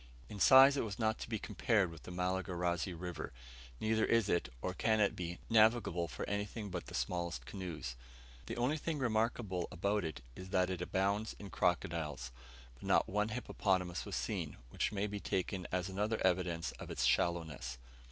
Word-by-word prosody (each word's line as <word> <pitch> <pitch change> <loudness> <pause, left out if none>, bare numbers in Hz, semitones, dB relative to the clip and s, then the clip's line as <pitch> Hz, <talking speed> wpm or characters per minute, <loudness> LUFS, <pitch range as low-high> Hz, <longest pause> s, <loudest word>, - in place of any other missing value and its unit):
In 105 - -7
size 135 +5 +8
it - - +1
was 105 -3 -4
not 110 -1 +1
to - - -6
be 110 - 0
compared 105 -6 +1
with 80 -2 -11
the - - -9
Malagarazi 90 0 -1
River, 90 0 -5 0.5
neither 110 0 +2
is 115 -3 +3
it, 85 -8 +1
or 90 - -2
can 110 +3 +2
it 100 - +3
be, 85 -1 -4
navigable 110 -6 +4
for - - -5
anything 105 +1 -3
but 90 -1 -4
the - - -7
smallest 85 -1 -2
canoes. 85 -10 -5 0.5
The - - -4
only 130 +6 +1
thing 160 0 -2
remarkable 110 -7 0
about 100 +5 0
it 80 -6 -5
is 95 0 -8
that 90 -1 +2
it 90 -2 -3
abounds 100 +4 0
in 100 -2 -9
crocodiles, 75 -7 0 0.4
but - - -21
not - - +3
one 105 +2 0
hippopotamus 95 -6 0
was - - -5
seen; - - -2
which - - 0
may 100 -1 -1
be 105 0 -3
taken 95 -1 -2
as 90 0 0
another 105 +3 -1
evidence 85 -2 +1
of - - -7
its - - 0
shallowness. 80 -8 0
95 Hz, 180 wpm, -35 LUFS, 85-110 Hz, 0.5 s, size